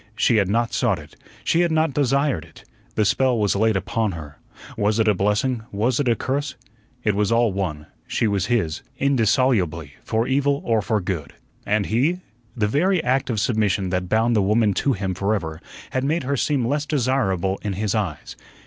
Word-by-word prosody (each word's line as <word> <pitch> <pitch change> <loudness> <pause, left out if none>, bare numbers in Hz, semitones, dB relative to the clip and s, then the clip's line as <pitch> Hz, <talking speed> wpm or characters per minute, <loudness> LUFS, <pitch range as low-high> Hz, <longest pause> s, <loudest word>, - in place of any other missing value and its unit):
She 115 +1 +3
had 100 -3 +2
not 115 +2 0
sought - - +1
it, - - -13 0.3
she 165 - +2
had 175 -1 +2
not 160 -2 +1
desired 140 - +1
it. - - -16 0.3
The 110 - +2
spell 125 +4 +2
was 105 -2 +1
laid 110 +1 +2
upon 105 +2 -1
her. 75 -3 -9 0.4
Was 105 +1 +1
it 110 -1 +2
a 105 - +5
blessing? 105 +6 0
Was 115 +6 0
it 145 - 0
a 115 - +3
curse? 140 +3 -2 0.5
It 105 - +2
was 105 +1 0
all 115 -3 +3
one; 80 -6 -3 0.2
she 115 - 0
was 100 -2 0
his, 85 -10 0 0.2
indissolubly, 110 - +1
for 115 +1 0
evil 140 +1 +1
or 115 -2 +2
for 105 0 0
good. 85 -6 -4 0.3
And 105 0 +1
he? 150 +11 +1 0.4
The 110 - +2
very 170 - +1
act 130 +2 +1
of 110 -3 0
submission 105 -4 0
that 90 -1 -2
bound 115 +3 +2
the 105 - +3
woman 105 +1 +2
to 140 - +2
him 95 -3 -2
forever 90 -5 -2 0.3
had 130 - -1
made 150 +3 0
her 140 +2 -1
seem 135 -2 0
less 145 +3 -1
desirable 115 - 0
in 105 - -3
his 105 +1 -1
eyes. 100 -9 -3
110 Hz, 195 wpm, -22 LUFS, 100-130 Hz, 0.5 s, a